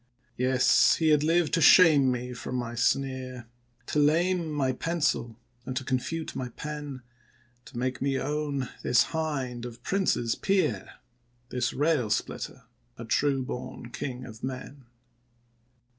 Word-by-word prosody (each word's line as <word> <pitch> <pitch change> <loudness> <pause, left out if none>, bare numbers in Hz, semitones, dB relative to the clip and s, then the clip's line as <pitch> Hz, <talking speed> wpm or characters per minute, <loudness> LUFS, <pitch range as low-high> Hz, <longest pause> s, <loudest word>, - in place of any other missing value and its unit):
Yes, 130 0 +4
he 160 -1 +1
had 150 -1 +4
lived 165 +1 +2
to 165 - +2
shame 150 -5 +7
me 125 0 -4
from 125 - -6
my 120 -2 -3
sneer, 130 0 -1 0.4
To 150 - -1
lame 165 +3 +2
my 140 -3 +1
pencil, 140 -6 -1 0.3
and 130 +1 -4
confute 150 +5 -2
my 125 -1 -3
pen; 145 -1 -7 0.6
To - - -11
make 130 +1 -2
me 135 0 +1
own 145 -1 -2
this 120 - +4
hind 135 -7 -2
of 120 -1 -9
princes 180 - +1
peer, 190 -5 0 0.6
This 125 -2 -1
rail 145 -5 +1
splitter 105 - -3 0.3
a - - -7
true 140 -2 +1
born 125 -1 -7
king 125 -1 -5
of 110 -2 -12
men. 130 +1 -6
135 Hz, 135 wpm, -28 LUFS, 125-150 Hz, 0.6 s, shame